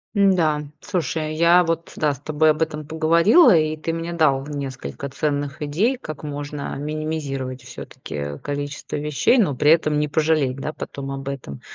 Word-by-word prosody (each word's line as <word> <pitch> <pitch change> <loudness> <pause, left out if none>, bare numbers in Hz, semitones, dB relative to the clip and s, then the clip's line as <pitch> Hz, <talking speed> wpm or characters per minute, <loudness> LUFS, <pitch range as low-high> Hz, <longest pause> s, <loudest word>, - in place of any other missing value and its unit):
М-да. 175 -7 +3 0.2
Слушай, 160 -5 -2
я 170 +2 +5
вот, 165 0 -3
да, 150 -2 +1
с 135 - -11
тобой 155 +1 +2
об 155 +1 -3
этом 155 -2 -2
поговорила, 170 - +5
и 155 -1 +2
ты 165 +2 -3
мне 165 +1 -4
дал 145 -4 +2
несколько 140 - -5
ценных 145 +1 -2
идей, 195 - +1
как 155 - -8
можно 145 0 -5
минимизировать 145 -4 -4
всё-таки 75 - -7
количество 145 0 -5
вещей, 150 - +2
но 190 -11 +3
при 150 +4 +4
этом 155 -2 +3
не 150 - +1
пожалеть, 150 -3 +1
да, 150 +3 -5
потом 135 -1 -6
об 135 0 -6
этом. 130 - -7
150 Hz, 165 wpm, -22 LUFS, 140-160 Hz, 0.2 s, я